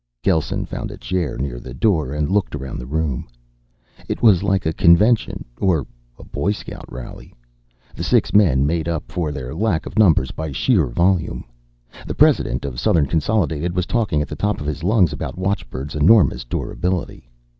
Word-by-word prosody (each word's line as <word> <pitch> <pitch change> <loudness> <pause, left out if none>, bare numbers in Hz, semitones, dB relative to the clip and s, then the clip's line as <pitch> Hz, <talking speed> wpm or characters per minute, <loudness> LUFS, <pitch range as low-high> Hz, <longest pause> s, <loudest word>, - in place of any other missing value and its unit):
Gelsen 80 -6 0
found - - -5
a - - -9
chair 90 -6 -2
near 65 -1 -4
the - - -9
door 80 - +1
and 75 0 -1
looked 100 -6 0
around 65 -3 -6
the 60 - -7
room. 75 -2 -2 0.8
It - - -3
was 105 -7 +6
like 100 -1 0
a 80 - 0
convention, 105 +9 +3
or 85 -8 +1 0.3
a - - -12
Boy 100 - -1
Scout - - -9
rally. 65 - -10 0.6
The - - -5
six - - +2
men 75 -11 +4
made 80 +1 -1
up 85 -2 -3
for 85 -4 -2
their 65 -3 -6
lack 90 -1 0
of - - -3
numbers 80 -11 +4
by 80 -2 -5
sheer 90 - +2
volume. 85 +7 0 0.6
The - - -4
president 65 +3 +2
of 60 -3 -5
Southern 80 -4 +3
Consolidated 85 0 0
was 90 -1 0
talking 105 -11 0
at - - -7
the - - -6
top 105 +7 -1
of 75 - -6
his 75 +2 -4
lungs 95 -3 +3
about - - -5
watchbird's 90 -7 -3
enormous 85 - +4
durability. 90 -2 -3
80 Hz, 175 wpm, -20 LUFS, 70-95 Hz, 0.8 s, was